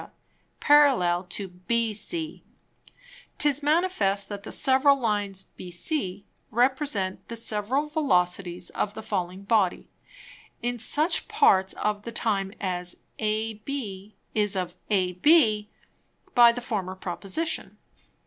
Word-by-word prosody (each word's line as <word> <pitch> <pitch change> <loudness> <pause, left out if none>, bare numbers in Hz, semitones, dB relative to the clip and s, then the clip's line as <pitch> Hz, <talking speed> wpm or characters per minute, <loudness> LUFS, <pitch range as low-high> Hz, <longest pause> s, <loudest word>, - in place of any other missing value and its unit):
_ - - -13 0.5
parallel 260 - +4
to 190 +2 -2
BC, 230 - -2 1.0
'tis 295 -1 +2
manifest 290 - +1
that 205 -1 -6
the - - -9
several 275 +1 +4
Lines, 205 -5 -1
bc, 185 - -2 0.3
represent 245 -5 0
the 230 - -6
several 225 +5 -1
Velocities 180 - 0
of 205 0 -2
the 220 - -7
falling 185 -2 -3
Body, 200 -3 +1 0.7
in 245 0 -3
such 305 - +2
Parts 190 0 +3
of 210 -1 -2
the 235 - -7
Time 200 -4 0
as 180 -2 0 0.2
Ab 215 +1 -2 0.6
is 210 -2 +1
of 180 -1 -3
AB, 210 - +3 0.6
by 240 -1 +8
the 245 +1 -6
former 195 -6 -3
Proposition. 195 - -4
210 Hz, 110 wpm, -26 LUFS, 190-260 Hz, 1.0 s, by